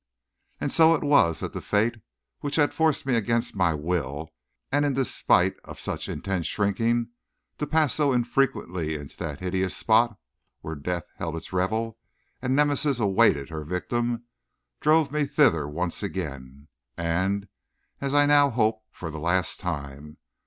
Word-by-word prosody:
And -, -, -2 dB
so 165 Hz, 0 st, +6 dB
it 155 Hz, -, -3 dB
was 140 Hz, -, +4 dB
that -, -, -4 dB
the -, -, -5 dB
fate 110 Hz, +3 st, +1 dB, 0.4 s
which 145 Hz, 0 st, -3 dB
had 145 Hz, -2 st, +3 dB
forced 160 Hz, -4 st, +1 dB
me 130 Hz, -2 st, +1 dB
against 115 Hz, +1 st, 0 dB
my 90 Hz, -5 st, +2 dB
will, 75 Hz, -1 st, -3 dB, 0.4 s
and 145 Hz, +1 st, +2 dB
in 145 Hz, -1 st, +1 dB
despite 135 Hz, -2 st, +2 dB
of -, -, -11 dB
such -, -, -3 dB
intense 95 Hz, -5 st, -2 dB
shrinking, 115 Hz, +3 st, 0 dB, 0.5 s
to 150 Hz, -, -2 dB
pass 155 Hz, -3 st, +2 dB
so 140 Hz, -5 st, +2 dB
frequently 90 Hz, -, -1 dB
into 75 Hz, -2 st, -8 dB
that 80 Hz, -3 st, -5 dB
hideous 95 Hz, 0 st, -1 dB
spot, 115 Hz, -1 st, +3 dB, 0.4 s
where 80 Hz, -, -5 dB
death 85 Hz, +3 st, -3 dB
held 80 Hz, -1 st, -3 dB
its 80 Hz, +3 st, -8 dB
revel 110 Hz, +5 st, -1 dB, 0.4 s
and 130 Hz, +1 st, 0 dB
Nemesis 145 Hz, -2 st, +2 dB
awaited 95 Hz, -9 st, +3 dB
her 80 Hz, -1 st, -5 dB
victim, 120 Hz, +8 st, -2 dB, 0.6 s
drove 155 Hz, -1 st, +3 dB
me 150 Hz, 0 st, +1 dB
thither 135 Hz, -, +3 dB
once 85 Hz, +3 st, -2 dB
again, 70 Hz, 0 st, -6 dB, 0.3 s
and, 95 Hz, +4 st, 0 dB, 0.5 s
as 140 Hz, 0 st, -2 dB
I 145 Hz, 0 st, +6 dB
now 145 Hz, -1 st, +5 dB
hope, 110 Hz, -2 st, +1 dB
for 80 Hz, -3 st, -7 dB
the 80 Hz, -, -6 dB
last 85 Hz, +2 st, 0 dB
time. 70 Hz, +1 st, -6 dB
105 Hz, 155 wpm, -26 LUFS, 80-135 Hz, 0.6 s, so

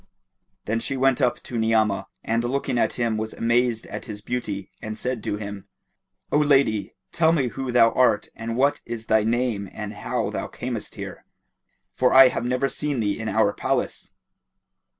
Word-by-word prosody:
Then 110 Hz, +2 st, 0 dB
she 135 Hz, +3 st, -3 dB
went 135 Hz, +1 st, +3 dB
up 125 Hz, -2 st, +1 dB
to 120 Hz, -, -4 dB
Ni'amah 110 Hz, -3 st, +2 dB, 0.2 s
and 115 Hz, +1 st, 0 dB
looking 125 Hz, 0 st, -1 dB
at -, -, +2 dB
him 115 Hz, -2 st, 0 dB
was 110 Hz, 0 st, -4 dB
amazed 120 Hz, 0 st, +1 dB
at -, -, -7 dB
his 105 Hz, -2 st, -6 dB
beauty 105 Hz, -4 st, -4 dB
and 110 Hz, 0 st, -5 dB
said 125 Hz, -3 st, -3 dB
to -, -, -1 dB
him, 100 Hz, -1 st, -7 dB, 0.6 s
"O 150 Hz, -, +4 dB
lady, 135 Hz, -9 st, +2 dB, 0.2 s
tell 160 Hz, -1 st, +3 dB
me 140 Hz, -7 st, +1 dB
who 130 Hz, +1 st, -4 dB
thou 115 Hz, -2 st, +5 dB
art 115 Hz, -5 st, +3 dB
and 115 Hz, +1 st, -4 dB
what 140 Hz, +2 st, +2 dB
is 115 Hz, -1 st, -6 dB
thy 110 Hz, -1 st, +3 dB
name 115 Hz, -3 st, 0 dB
and 105 Hz, 0 st, -6 dB
how -, -, -2 dB
thou -, -, -3 dB
camest -, -, -5 dB
here; -, -, -7 dB, 0.7 s
for 125 Hz, 0 st, +2 dB
I 130 Hz, -1 st, +10 dB
have 120 Hz, -, -3 dB
never 125 Hz, +2 st, +1 dB
seen 145 Hz, -2 st, -2 dB
thee 105 Hz, -1 st, 0 dB
in 110 Hz, -1 st, -3 dB
our 100 Hz, 0 st, +2 dB
palace." -, -, -2 dB
115 Hz, 180 wpm, -24 LUFS, 110-125 Hz, 0.7 s, I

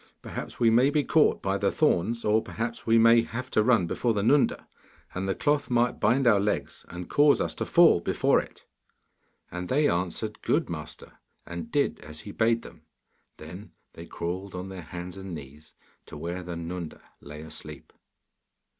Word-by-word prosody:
Perhaps -, -, -7 dB
we 115 Hz, -2 st, +4 dB
may 125 Hz, +4 st, +4 dB
be 145 Hz, 0 st, +1 dB
caught 155 Hz, +1 st, +2 dB
by 95 Hz, 0 st, 0 dB
the 100 Hz, -, +2 dB
thorns, 115 Hz, -, +1 dB
or 110 Hz, +1 st, +3 dB
perhaps 115 Hz, +2 st, -5 dB
we 115 Hz, 0 st, +5 dB
may 115 Hz, +1 st, +6 dB
have 125 Hz, +2 st, -6 dB
to 110 Hz, -, +3 dB
run 110 Hz, -5 st, +3 dB
before 115 Hz, +6 st, -1 dB
the 100 Hz, -, 0 dB
Nunda, 140 Hz, +5 st, +2 dB, 0.5 s
and 95 Hz, +1 st, -3 dB
the 95 Hz, -, 0 dB
cloth 145 Hz, -1 st, 0 dB
might 120 Hz, 0 st, +1 dB
bind 125 Hz, +5 st, +2 dB
our 105 Hz, -4 st, +5 dB
legs, 105 Hz, +1 st, -3 dB
and 90 Hz, 0 st, -7 dB
cause 145 Hz, 0 st, +4 dB
us -, -, -1 dB
to -, -, -4 dB
fall 170 Hz, -, +6 dB
before 85 Hz, -, +2 dB
it.' -, -, -14 dB, 0.9 s
And 90 Hz, 0 st, -5 dB
they 145 Hz, +3 st, +3 dB
answered, 90 Hz, +5 st, -2 dB
'Good, -, -, 0 dB
master,' 75 Hz, -2 st, -8 dB, 0.3 s
and 85 Hz, -1 st, -7 dB
did -, -, 0 dB
as 75 Hz, 0 st, -10 dB
he 100 Hz, -, -9 dB
bade 115 Hz, +2 st, +1 dB
them. -, -, -13 dB, 0.6 s
Then -, -, -11 dB, 0.2 s
they 85 Hz, +1 st, -10 dB
crawled 90 Hz, +3 st, -5 dB
on 90 Hz, +1 st, -6 dB
their 95 Hz, -2 st, -7 dB
hands 90 Hz, +3 st, -8 dB
and 95 Hz, -2 st, -7 dB
knees 75 Hz, +1 st, -12 dB, 0.3 s
to -, -, -9 dB
where 85 Hz, +2 st, -4 dB
the 90 Hz, -1 st, -6 dB
Nunda 85 Hz, 0 st, -6 dB, 0.2 s
lay 75 Hz, +1 st, -10 dB
asleep. 75 Hz, -1 st, -10 dB
100 Hz, 180 wpm, -27 LUFS, 85-115 Hz, 0.9 s, may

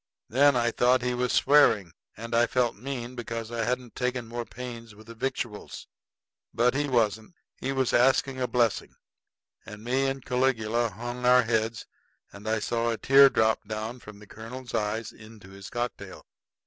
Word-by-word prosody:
Then 140 Hz, +3 st, +4 dB
I 120 Hz, -1 st, +1 dB
thought 125 Hz, +1 st, +2 dB
he 125 Hz, 0 st, 0 dB
was 125 Hz, 0 st, -1 dB
swearing; 115 Hz, -, +4 dB, 0.2 s
and 115 Hz, +2 st, -7 dB
I 120 Hz, +1 st, +4 dB
felt 120 Hz, -2 st, 0 dB
mean 125 Hz, +1 st, -6 dB
because 115 Hz, -2 st, -6 dB
I 115 Hz, -1 st, -2 dB
hadn't 125 Hz, 0 st, -3 dB
taken 125 Hz, -2 st, -2 dB
more 120 Hz, +1 st, -5 dB
pains 115 Hz, -3 st, -9 dB
with 110 Hz, +1 st, -16 dB
the 115 Hz, -, -10 dB
victuals. 120 Hz, -3 st, -5 dB, 0.7 s
But 120 Hz, +2 st, +3 dB
he 145 Hz, +1 st, 0 dB
wasn't; 110 Hz, -, 0 dB, 0.2 s
he 135 Hz, -, -3 dB
was 130 Hz, -2 st, 0 dB
asking 130 Hz, +1 st, +2 dB
a 125 Hz, -, +1 dB
blessing; 120 Hz, -4 st, 0 dB, 0.7 s
and 105 Hz, 0 st, -11 dB
me 130 Hz, +3 st, +1 dB
and 135 Hz, -1 st, -4 dB
Caligula 120 Hz, -3 st, +1 dB
hung 120 Hz, +3 st, -7 dB
our 125 Hz, 0 st, +6 dB
heads, 110 Hz, -1 st, -1 dB, 0.5 s
and 105 Hz, +2 st, -7 dB
I 110 Hz, -, +1 dB
saw 115 Hz, +2 st, -1 dB
a 115 Hz, -, -1 dB
tear 135 Hz, +3 st, +7 dB
drop 110 Hz, -3 st, +2 dB, 0.4 s
from 105 Hz, -2 st, -12 dB
the 105 Hz, 0 st, -15 dB
colonel's 120 Hz, +3 st, -9 dB
eye 110 Hz, +1 st, -1 dB
into 110 Hz, -3 st, -14 dB
his 95 Hz, 0 st, -10 dB
cocktail. 120 Hz, -6 st, -5 dB
120 Hz, 170 wpm, -27 LUFS, 110-125 Hz, 0.7 s, tear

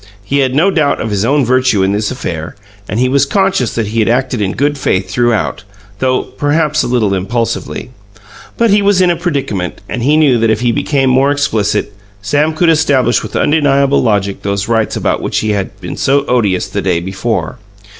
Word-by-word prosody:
He 140 Hz, +8 st, -1 dB
had 130 Hz, -1 st, +1 dB
no 175 Hz, +7 st, +3 dB
doubt 150 Hz, -5 st, +1 dB
of 110 Hz, -, -3 dB
his 100 Hz, -1 st, 0 dB
own 140 Hz, +3 st, +2 dB
virtue 130 Hz, -5 st, +2 dB
in 95 Hz, -, +1 dB
this 105 Hz, +1 st, -1 dB
affair, 85 Hz, -11 st, -5 dB, 0.3 s
and 105 Hz, -, -2 dB
he 130 Hz, -, +2 dB
was 140 Hz, +2 st, +2 dB
conscious 190 Hz, -, 0 dB
that 110 Hz, -3 st, -2 dB
he 115 Hz, +1 st, -2 dB
had 110 Hz, -, +2 dB
acted 125 Hz, -1 st, 0 dB
in 95 Hz, -2 st, -1 dB
good 145 Hz, +3 st, 0 dB
faith 95 Hz, -8 st, -1 dB
throughout 115 Hz, -2 st, 0 dB, 0.4 s
though, 130 Hz, -1 st, +1 dB
perhaps, 150 Hz, +1 st, 0 dB
a -, -, -2 dB
little 115 Hz, -5 st, +1 dB
impulsively. 115 Hz, +5 st, -3 dB, 0.7 s
But 230 Hz, -2 st, +2 dB
he 205 Hz, +1 st, +4 dB
was 200 Hz, -1 st, +2 dB
in 180 Hz, -1 st, +4 dB
a -, -, 0 dB
predicament, 140 Hz, -, -3 dB
and 125 Hz, -, -4 dB
he 145 Hz, +5 st, +3 dB
knew 140 Hz, -6 st, +3 dB
that 115 Hz, 0 st, +2 dB
if 110 Hz, 0 st, +1 dB
he 120 Hz, -1 st, +2 dB
became 135 Hz, +2 st, 0 dB
more 135 Hz, +2 st, +3 dB
explicit, 115 Hz, -8 st, 0 dB, 0.3 s
Sam 145 Hz, +10 st, 0 dB
could 170 Hz, +1 st, +2 dB
establish 140 Hz, -7 st, +2 dB
with -, -, -8 dB
undeniable 140 Hz, -2 st, +2 dB
logic 100 Hz, -4 st, 0 dB
those 100 Hz, 0 st, -2 dB
rights 115 Hz, -2 st, 0 dB
about -, -, -1 dB
which -, -, -2 dB
he 110 Hz, -, -1 dB
had 100 Hz, -2 st, -3 dB
been -, -, -7 dB
so 140 Hz, +1 st, +1 dB
odious 105 Hz, -8 st, 0 dB
the -, -, -3 dB
day 90 Hz, -3 st, 0 dB
before. 95 Hz, -, -3 dB
125 Hz, 205 wpm, -13 LUFS, 105-145 Hz, 0.7 s, he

